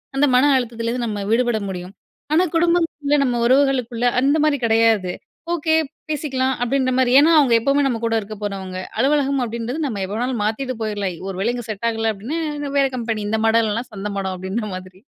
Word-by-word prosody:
அந்த 280 +2 +4
மன 285 +3 +5
அழுத்தத்துல 230 -2 -3
இருந்து 245 0 -2
நம்ம 205 -2 -3
விடுபட 240 -1 +2
முடியும். 180 0 -7 0.4
ஆனா 345 - +4
குடும்பங்கள்ல 330 -4 +1
நம்ம 245 -2 0
உறவுகளுக்குள்ள 255 -2 +2
அந்த 280 +4 +3
மாரி 300 -2 +2
கெடையாது. 225 -5 +3 0.4
ஓகே 320 -1 0 0.4
பேசிக்கலாம், 265 -3 -1
அப்டின்ற 255 +1 +1
மாரி 250 -1 +3
ஏன்னா 320 +3 +5
அவங்க 265 -5 +3
எப்பவுமே 280 +4 +2
நம்ம 235 -4 -1
கூட 225 0 +1
இருக்க 215 +1 -8
போறவங்க. 190 -2 -4 0.2
அலுவலகம் 275 0 +2
அப்டின்றது 235 +7 -3
நம்ம 205 -6 -3
எப்ப 195 - -6
வேணாலும் 240 -1 -1
மாத்திட்டு 255 +4 -2
போய்ரலாம், 205 -5 -3
ஒருவேள 195 +5 -1
இங்க 240 -2 -6
செட் 215 +3 -3
ஆகல 225 -1 -1
அப்டின்னா, 235 +11 -4 0.4
வேற 275 - +4
கம்பெனி 225 -3 -2
"இந்த 220 +1 0
மடம் 230 +1 +4
இல்லனா 220 +3 -1
சந்த 205 0 -5
மடம் 190 -1 -3
அப்டின்ற 195 +4 -3
மாதிரி." 185 0 -11
235 Hz, 180 wpm, -21 LUFS, 215-275 Hz, 0.4 s, மன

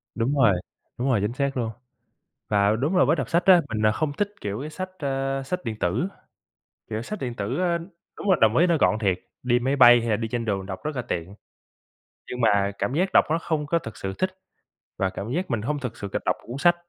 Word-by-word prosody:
Đúng 120 +5 0
rồi. 115 -6 +6 0.5
Đúng 125 +3 0
rồi, 115 -5 +3
chính 105 +3 -1
xác 140 +1 -1
luôn. 115 -3 -1 0.8
Và 100 -1 +3
đúng 145 +11 0
là - - +6
với 150 - +3
đọc - - -3
sách 170 +1 +2
á, 180 -3 +7
mình, 110 -1 -2
ờ, 110 - +5
không 145 +6 -1
thích, 205 +7 -1
kiểu, 100 +1 -3
cái 150 - -5
sách, 185 +4 -5
ơ, 135 -1 -1
sách 180 +6 -3
điện 115 -3 -3
tử. 105 - 0 0.8
Kiểu 110 0 -3
sách 210 - -6
điện 125 -3 -3
tử, 110 +4 -3
a, 175 -2 +2 0.4
đúng 205 - -3
là 185 - +6
đồng 110 +1 +5
ý 175 - +5
nó 170 -2 +3
gọn 110 - +3
thiệt, 95 -4 +1 0.2
đi 120 -1 +3
máy 130 +3 0
bay 120 -3 +8
hay 115 - -3
là 110 - +3
đi 115 +2 -3
trên 115 +1 -3
đường 100 -3 -1
đọc 95 -1 -6
rất 155 -1 -3
là 125 - -1
tiện, 95 -5 -4 1.0
nhưng 125 - -4
mà 100 -3 +3
cảm 100 +7 -1
giác 185 +5 +1
đọc - - +6
nó 160 - +2
không 160 -3 -2
có 170 +4 +2
thực 115 -8 -9
sự 95 0 -4
thích 185 0 +1 0.7
và 95 - +1
cảm 100 +3 -6
giác 175 +1 -2
mình 115 -3 0
hông 145 +5 -2
thực 125 -3 -5
sự 100 - -5
cầm - - -2
đọc - - +2
một - - -21
cuốn 120 +3 -5
sách. 175 +3 +5
125 Hz, 255 wpm, -25 LUFS, 110-155 Hz, 1.0 s, bay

